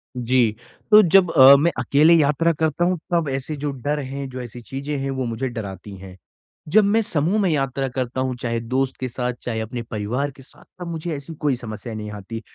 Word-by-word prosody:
जी। 120 Hz, -2 st, +1 dB, 0.4 s
तो 210 Hz, 0 st, +10 dB
जब 180 Hz, -1 st, +4 dB
अ, 135 Hz, +1 st, +9 dB
मैं 160 Hz, +5 st, +2 dB
अकेले 145 Hz, +6 st, +4 dB
यात्रा 160 Hz, +1 st, +3 dB
करता 160 Hz, +2 st, +1 dB
हूँ 180 Hz, 0 st, +1 dB, 0.2 s
तब 165 Hz, -4 st, +1 dB
ऐसे 135 Hz, +3 st, -3 dB
जो 145 Hz, 0 st, -3 dB
डर 145 Hz, +3 st, -3 dB
है, 140 Hz, 0 st, -5 dB
जो 130 Hz, 0 st, -7 dB
ऐसी 120 Hz, 0 st, -9 dB
चीज़ें 140 Hz, +4 st, -5 dB
हैं 135 Hz, 0 st, -3 dB
वो 130 Hz, -1 st, -2 dB
मुझे 120 Hz, +3 st, -3 dB
डराती 100 Hz, -4 st, -7 dB
हैं। 95 Hz, 0 st, -12 dB, 0.5 s
जब 215 Hz, +2 st, +6 dB
मैं 210 Hz, +3 st, +3 dB
समूह 175 Hz, +1 st, 0 dB
में 190 Hz, -, +2 dB
यात्रा 135 Hz, -2 st, -1 dB
करता 130 Hz, 0 st, -2 dB
हूँ 130 Hz, -1 st, -1 dB
चाहे 115 Hz, -1 st, -1 dB
दोस्त 130 Hz, +3 st, -1 dB
के 130 Hz, -1 st, -3 dB
साथ, 125 Hz, +1 st, -3 dB
चाहे 115 Hz, -2 st, -3 dB
अपने 120 Hz, +2 st, -5 dB
परिवार 115 Hz, +6 st, -3 dB
के 135 Hz, 0 st, -16 dB
साथ, -, -, -18 dB, 0.2 s
तब 175 Hz, -, -6 dB
मुझे 165 Hz, 0 st, -4 dB
ऐसी 140 Hz, +3 st, -8 dB
कोई 145 Hz, -3 st, 0 dB
समस्या 115 Hz, -1 st, -7 dB
नहीं 105 Hz, -1 st, -6 dB
आती, 105 Hz, +2 st, -7 dB
135 Hz, 215 wpm, -22 LUFS, 120-150 Hz, 0.5 s, तो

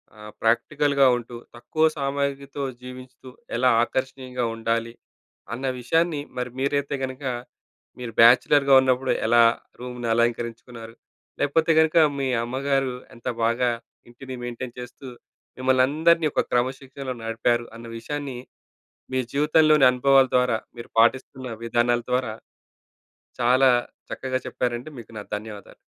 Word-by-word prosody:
ఆహ్, 105 Hz, 0 st, -11 dB
ప్రాక్టికల్‌గా 140 Hz, +5 st, +2 dB
ఉంటూ 120 Hz, 0 st, -9 dB, 0.2 s
తక్కువ 155 Hz, +6 st, 0 dB
సామాగ్రితో 140 Hz, 0 st, -3 dB, 0.2 s
జీవించుతూ 130 Hz, +1 st, -11 dB, 0.3 s
ఎలా 125 Hz, +2 st, +3 dB
ఆకర్షణీయంగా 130 Hz, -1 st, -3 dB
ఉండాలి, 115 Hz, 0 st, -1 dB, 0.6 s
అన్న 130 Hz, +4 st, -4 dB
విషయాన్ని 160 Hz, +5 st, +1 dB, 0.2 s
మరి 125 Hz, 0 st, -2 dB
మీరైతే 140 Hz, +1 st, 0 dB
గనక 130 Hz, +2 st, -5 dB, 0.8 s
మీరు 120 Hz, -2 st, -6 dB
బ్యాచలర్‌‌గా 135 Hz, +4 st, +6 dB
ఉన్నప్పుడు 130 Hz, 0 st, +1 dB, 0.2 s
ఎలా 120 Hz, +1 st, +5 dB, 0.4 s
రూమ్‌ని 125 Hz, -1 st, -6 dB
అలంకరించుకున్నారు. 115 Hz, 0 st, -2 dB, 0.5 s
లేకపోతే 160 Hz, +3 st, +2 dB
గనుక 160 Hz, +1 st, +3 dB, 0.2 s
మీ 135 Hz, -, 0 dB, 0.2 s
అమ్మగారు 135 Hz, +1 st, -1 dB, 0.2 s
ఎంత 120 Hz, +2 st, -10 dB, 0.2 s
బాగా 120 Hz, +2 st, +2 dB, 0.4 s
ఇంటిని 130 Hz, +2 st, -9 dB
మెయింటెయిన్ 120 Hz, 0 st, -6 dB
చేస్తూ 125 Hz, +2 st, -10 dB, 0.5 s
మిమ్మల్నందరిని 150 Hz, +6 st, +3 dB
ఒక -, -, +2 dB
క్రమశిక్షణలో 130 Hz, +1 st, -2 dB
నడిపారు 115 Hz, +1 st, 0 dB
అన్న 115 Hz, -, -11 dB
విషయాన్ని, 140 Hz, 0 st, -5 dB, 0.8 s
మీ 130 Hz, -, +1 dB
జీవితంలోని 150 Hz, 0 st, +4 dB
అనుభవాల 135 Hz, +1 st, +4 dB
ద్వారా 125 Hz, -3 st, +2 dB, 0.2 s
మీరు 120 Hz, -, -10 dB
పాటిస్తున్న 130 Hz, +1 st, 0 dB
విధానాల 120 Hz, +1 st, +1 dB
ద్వారా 125 Hz, -4 st, 0 dB, 1.1 s
చాలా 130 Hz, +2 st, +5 dB, 0.4 s
చక్కగా 130 Hz, -1 st, -2 dB
చెప్పారండి. 120 Hz, +4 st, -3 dB
మీకు 115 Hz, -, -12 dB
నా -, -, -7 dB
ధన్యవాదాలు. 105 Hz, -1 st, -9 dB
130 Hz, 115 wpm, -24 LUFS, 120-140 Hz, 1.1 s, బ్యాచలర్‌‌గా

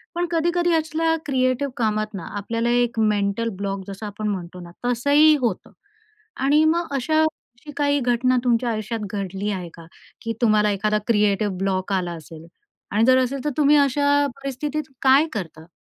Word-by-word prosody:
पण 350 Hz, +1 st, 0 dB
कधी-कधी 345 Hz, +1 st, +1 dB
असल्या 325 Hz, +1 st, +1 dB
क्रिएटिव 260 Hz, 0 st, 0 dB
कामात 215 Hz, -2 st, -1 dB
ना, 185 Hz, -5 st, -6 dB
आपल्याला 230 Hz, +3 st, -2 dB
एक 240 Hz, -1 st, +1 dB
मेंटल 210 Hz, +1 st, +1 dB
ब्लॉक 195 Hz, 0 st, -3 dB
जसं 200 Hz, +2 st, -7 dB
आपण 210 Hz, +1 st, -5 dB
म्हणतो 180 Hz, -3 st, -4 dB
ना, 175 Hz, -1 st, -10 dB
तसंही 285 Hz, +6 st, +4 dB
होतं 230 Hz, -7 st, -2 dB, 0.7 s
आणि 295 Hz, +3 st, +4 dB
मग 335 Hz, +2 st, +1 dB
अशा 310 Hz, +4 st, +1 dB
अशी 295 Hz, -3 st, -6 dB
काही 285 Hz, 0 st, +2 dB
घटना 250 Hz, 0 st, +1 dB
तुमच्या 240 Hz, -1 st, +1 dB
आयुष्यात 220 Hz, +1 st, -3 dB
घडली 195 Hz, 0 st, -3 dB
आहे 180 Hz, -3 st, -5 dB
का? 165 Hz, -, -13 dB, 0.4 s
की 230 Hz, -, -3 dB
तुम्हाला, 215 Hz, -2 st, +3 dB
एखादा 210 Hz, +1 st, 0 dB
क्रिएटिव 210 Hz, -2 st, +2 dB
ब्लॉक 190 Hz, 0 st, -1 dB
आला 180 Hz, -2 st, -1 dB
असेल 160 Hz, 0 st, -11 dB, 0.5 s
आणि 210 Hz, +2 st, +2 dB
जर 255 Hz, +1 st, +5 dB
असेल 260 Hz, +1 st, -4 dB
तर -, -, +2 dB
तुम्ही 295 Hz, 0 st, +5 dB
अशा 285 Hz, +1 st, +3 dB
परिस्थितीत 285 Hz, +3 st, -4 dB, 0.2 s
काय 270 Hz, +3 st, +6 dB
करता? 165 Hz, -6 st, -6 dB
235 Hz, 165 wpm, -22 LUFS, 200-285 Hz, 0.7 s, काय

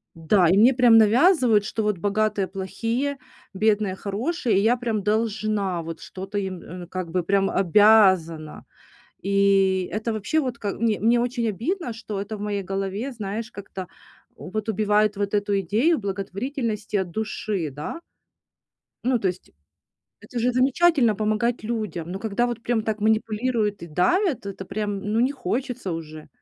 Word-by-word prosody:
Да, 170 Hz, +3 st, +3 dB
и 185 Hz, -, +4 dB
мне 235 Hz, +6 st, +6 dB
прям 240 Hz, -3 st, +6 dB
навязывают, 235 Hz, -, +4 dB
что 220 Hz, +1 st, -2 dB
вот 210 Hz, -2 st, 0 dB
богатые 205 Hz, +1 st, 0 dB
плохие, 230 Hz, +9 st, -3 dB, 0.4 s
бедные 205 Hz, -1 st, +1 dB
хорошие, 220 Hz, -, -1 dB
и -, -, +2 dB
я 230 Hz, +4 st, +3 dB
прям 230 Hz, -3 st, -2 dB
должна, 210 Hz, -3 st, 0 dB
вот 165 Hz, 0 st, -7 dB
что-то 195 Hz, +2 st, -7 dB
им, 190 Hz, -3 st, -3 dB
э, 175 Hz, 0 st, -9 dB
как 185 Hz, -1 st, -5 dB
бы 180 Hz, +1 st, -1 dB
прям 195 Hz, +2 st, +2 dB
обязана. 185 Hz, -5 st, +3 dB, 0.6 s
И 195 Hz, -1 st, +2 dB
это 220 Hz, +2 st, -2 dB
вообще 215 Hz, +9 st, 0 dB
вот 255 Hz, -5 st, -2 dB
как 205 Hz, -3 st, -3 dB
мн 230 Hz, -, +2 dB, 0.2 s
мне 235 Hz, +2 st, +4 dB
очень 240 Hz, -1 st, -1 dB
обидно, 240 Hz, -, -2 dB
что 220 Hz, -2 st, -6 dB
это 210 Hz, +2 st, -6 dB
в -, -, -13 dB
моей 205 Hz, -1 st, -2 dB
голове, 195 Hz, +6 st, -3 dB
знаешь, 220 Hz, -1 st, -5 dB
как-то 190 Hz, -2 st, -8 dB, 0.5 s
вот 215 Hz, +3 st, -5 dB
убивает 210 Hz, 0 st, +2 dB
вот 200 Hz, 0 st, -2 dB
эту 205 Hz, -1 st, +1 dB
идею 230 Hz, -, +2 dB
благотворительности 210 Hz, +3 st, -3 dB
от 190 Hz, -3 st, -2 dB
души, 210 Hz, -4 st, -3 dB
да? 150 Hz, -, -6 dB, 1.1 s
Ну, 250 Hz, -1 st, +2 dB
то 195 Hz, -, 0 dB
есть. 180 Hz, 0 st, -6 dB, 0.7 s
Это 240 Hz, -, -5 dB
же 245 Hz, +2 st, +2 dB
замечательно- 260 Hz, -1 st, +3 dB
помогать 215 Hz, +3 st, 0 dB
людям, 215 Hz, -7 st, -4 dB
но 190 Hz, -, -4 dB
когда 220 Hz, +3 st, 0 dB
вот 240 Hz, -1 st, -4 dB
прям 235 Hz, -1 st, 0 dB
так 215 Hz, 0 st, -2 dB
манипулируют 220 Hz, 0 st, 0 dB
и -, -, -6 dB
давят, 245 Hz, -, +1 dB
это 195 Hz, -1 st, -6 dB
прям, 205 Hz, +1 st, -3 dB
ну, 225 Hz, -, +2 dB
не 255 Hz, +3 st, +3 dB
хочется 250 Hz, -4 st, -3 dB
уже. 155 Hz, -1 st, -8 dB
210 Hz, 160 wpm, -24 LUFS, 195-235 Hz, 1.1 s, мне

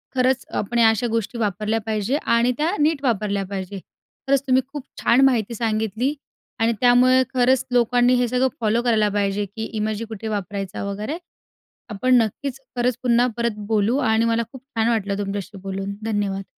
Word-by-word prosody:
खरंच 260 Hz, 0 st, +2 dB
आपण 235 Hz, +4 st, -1 dB
या 225 Hz, -1 st, +7 dB
अशा 225 Hz, +2 st, 0 dB
गोष्टी 230 Hz, +1 st, -2 dB
वापरल्या 215 Hz, +1 st, 0 dB
पाहिजे 220 Hz, +4 st, 0 dB
आणि 235 Hz, +1 st, +3 dB
त्या 325 Hz, +6 st, 0 dB
नीट 300 Hz, -1 st, +1 dB
वापरल्या 210 Hz, -5 st, 0 dB
पाहिजे. 195 Hz, 0 st, -5 dB, 0.5 s
खरंच 275 Hz, -1 st, +3 dB
तुम्ही 260 Hz, 0 st, +4 dB
खूप 285 Hz, 0 st, -7 dB, 0.2 s
छान 240 Hz, +3 st, +4 dB
माहिती 235 Hz, -4 st, +1 dB
सांगितली 220 Hz, +3 st, -1 dB, 0.5 s
आणि 225 Hz, +1 st, +2 dB
त्यामुळे 250 Hz, +1 st, +5 dB
खरंच 260 Hz, +1 st, +3 dB
लोकांनी 245 Hz, +1 st, +3 dB
हे 245 Hz, 0 st, +2 dB
सगळं 250 Hz, +2 st, +2 dB
फॉलो 225 Hz, +2 st, +2 dB
करायला 220 Hz, -3 st, +2 dB
पाहिजे, 205 Hz, 0 st, 0 dB
की 210 Hz, +3 st, -7 dB
इमोजी 215 Hz, +1 st, -2 dB
कुठे 220 Hz, 0 st, -7 dB
वापरायचा 200 Hz, -2 st, -4 dB
वगैरे. 210 Hz, +9 st, -4 dB, 0.7 s
आपण 255 Hz, +5 st, +1 dB
नक्कीच 260 Hz, +5 st, -4 dB, 0.2 s
खरंच 245 Hz, -1 st, +1 dB
पुन्हा 245 Hz, -1 st, +3 dB
परत 235 Hz, 0 st, +1 dB, 0.2 s
बोलू 220 Hz, +2 st, +2 dB
आणि 225 Hz, -4 st, +2 dB
मला 230 Hz, 0 st, +1 dB
खूप 265 Hz, -2 st, -11 dB
छान 230 Hz, -5 st, -1 dB
वाटलं 200 Hz, -4 st, 0 dB
तुमच्याशी 200 Hz, 0 st, -4 dB
बोलून. 195 Hz, +1 st, -4 dB
धन्यवाद. 205 Hz, -3 st, -2 dB
225 Hz, 165 wpm, -22 LUFS, 205-250 Hz, 0.7 s, या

